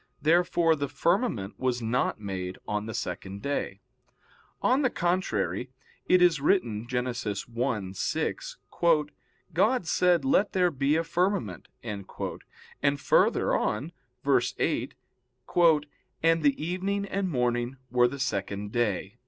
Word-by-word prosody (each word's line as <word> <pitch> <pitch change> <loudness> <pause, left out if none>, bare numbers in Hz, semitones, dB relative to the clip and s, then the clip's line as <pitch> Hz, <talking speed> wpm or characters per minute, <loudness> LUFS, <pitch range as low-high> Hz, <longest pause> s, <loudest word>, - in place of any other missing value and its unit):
Therefore 170 0 +3
the 145 -1 -2
firmament 140 - 0
was 125 -1 0
not 115 0 0
made 95 -3 -5
on 105 +1 -2
the 110 - -5
second 100 +1 -5
day. 140 0 -2 0.8
On 255 +3 +3
the 260 - +3
contrary, 130 - -1 0.4
It 180 -1 +5
is 165 -5 +4
written 120 - +1
(Gen. 125 0 -1
1:6): 120 - -1 0.5
"God 210 +5 +2
said: 180 +5 +2
let 265 -6 +2
there 180 -2 +3
be 140 +1 +1
a 165 - +1
firmament," 170 - -1 0.2
and 100 -4 -6 0.9
further - - +3
on 135 +10 -1 0.3
(verse 140 0 +2
8); - - -1 1.3
"And 165 0 +4
the 145 +1 +1
evening 195 +3 -1
and 195 -1 -2
morning 125 -2 0
were 125 -1 +5
the 140 +3 -5
second 100 -4 -3
day." 110 -2 -1
135 Hz, 120 wpm, -28 LUFS, 110-175 Hz, 1.3 s, It